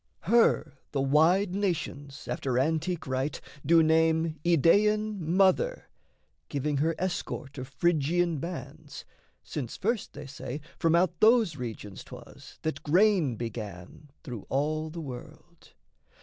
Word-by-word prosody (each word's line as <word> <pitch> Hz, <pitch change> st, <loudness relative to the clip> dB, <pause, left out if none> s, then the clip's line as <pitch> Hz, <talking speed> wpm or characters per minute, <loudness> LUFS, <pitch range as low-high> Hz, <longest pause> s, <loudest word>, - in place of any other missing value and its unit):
Her 165 Hz, -, +2 dB
the 140 Hz, -, 0 dB
wide 165 Hz, +8 st, +3 dB
nations, 155 Hz, -8 st, -3 dB
after 130 Hz, -2 st, -1 dB
antique 160 Hz, +5 st, 0 dB
rite, 130 Hz, +2 st, -2 dB, 0.2 s
Do 165 Hz, +2 st, +5 dB
name 160 Hz, 0 st, +2 dB
Idaean 210 Hz, +6 st, +3 dB
Mother, 190 Hz, -, +2 dB, 0.6 s
giving 145 Hz, 0 st, -1 dB
her 160 Hz, +4 st, +1 dB
Escort 160 Hz, -6 st, -4 dB
of 130 Hz, -, -6 dB
Phrygian 165 Hz, +3 st, +1 dB
bands, 155 Hz, -2 st, -7 dB, 0.4 s
since 130 Hz, -6 st, -5 dB
first, 225 Hz, +1 st, -1 dB
they 145 Hz, 0 st, -8 dB
say, 135 Hz, 0 st, -6 dB, 0.2 s
From 165 Hz, -1 st, +3 dB
out 175 Hz, 0 st, +2 dB
those 220 Hz, -6 st, +5 dB
regions 110 Hz, -6 st, -7 dB
'twas -, -, -13 dB
that 160 Hz, -, -2 dB
grain 175 Hz, -, +3 dB
began 110 Hz, -, -7 dB
Through 120 Hz, -9 st, -7 dB
all 155 Hz, +3 st, -1 dB
the 165 Hz, +1 st, -7 dB
world. 155 Hz, +5 st, -11 dB
160 Hz, 120 wpm, -28 LUFS, 140-175 Hz, 0.6 s, Do